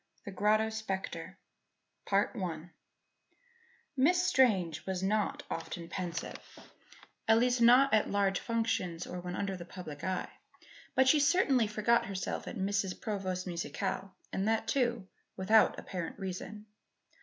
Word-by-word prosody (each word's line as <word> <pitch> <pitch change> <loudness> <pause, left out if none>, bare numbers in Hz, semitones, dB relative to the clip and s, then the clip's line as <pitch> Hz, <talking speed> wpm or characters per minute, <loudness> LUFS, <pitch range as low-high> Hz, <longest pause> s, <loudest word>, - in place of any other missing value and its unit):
THE 200 - -6
GROTTO 215 +3 +2
SPECTRE 190 -4 -5 2.6
Miss 350 +7 +3
Strange 190 - +3
was 190 -1 -2
not 210 +1 0
often 170 -2 -5
pensive 180 -2 -4 0.9
at 225 0 +6
least 245 +1 +2
not 250 +3 +6
at 215 - +3
large 200 -1 +1
functions 225 -7 -1
or 180 - -6
when 180 0 -5
under 195 -1 -2
the 175 - -7
public 165 -5 -9
eye. 185 -1 -2 0.6
But 260 0 +4
she 300 +3 +6
certainly 285 - +3
forgot 215 +2 +2
herself 190 -2 -4
at - - -5
Mrs. 195 -1 -1
Provost's 185 -4 -3
musicale 190 +2 -3 0.2
and 195 +2 0
that, 225 0 +1
too, 240 -5 0 0.3
without 215 +4 +4
apparent 175 -4 -5
reason. 195 +2 -6
200 Hz, 125 wpm, -32 LUFS, 185-225 Hz, 2.6 s, at